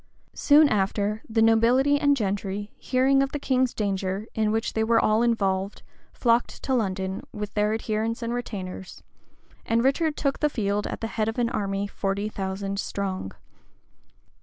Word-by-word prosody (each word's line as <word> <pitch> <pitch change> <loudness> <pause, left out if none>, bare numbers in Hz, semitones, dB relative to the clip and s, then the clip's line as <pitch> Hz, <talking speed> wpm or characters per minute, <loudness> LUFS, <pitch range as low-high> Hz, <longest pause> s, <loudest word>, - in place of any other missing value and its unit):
[*] - - -43
Soon 300 +1 +5
after, 205 0 0
the 225 0 +2
nobility 245 +6 +4
and 285 -1 +3
gentry, 205 -1 -3
hearing 270 +1 +2
of 275 0 -1
the - - -1
king's 260 -2 +1
danger, 195 -1 -2
in 215 -1 +1
which 225 +1 -1
they 220 - +1
were 225 0 +3
all 215 +1 +3
involved, 200 -4 0 0.3
flocked 235 0 0
to 265 - -1
London, 190 -5 -1
with 210 0 -6
their 210 0 +1
adherents 220 +1 -2
and 230 +1 -2
retainers; 190 -6 -6 0.6
and 230 +1 +1
Richard 295 +3 +1
took 275 -1 -1
the 300 - +2
field 205 -5 -1
at - - -6
the - - -2
head 220 -1 -2
of 225 - -5
an 240 -1 +1
army 200 -4 -1
forty 200 +1 -2
thousand 195 0 -4
strong. 190 - -3
220 Hz, 165 wpm, -25 LUFS, 200-240 Hz, 0.6 s, Soon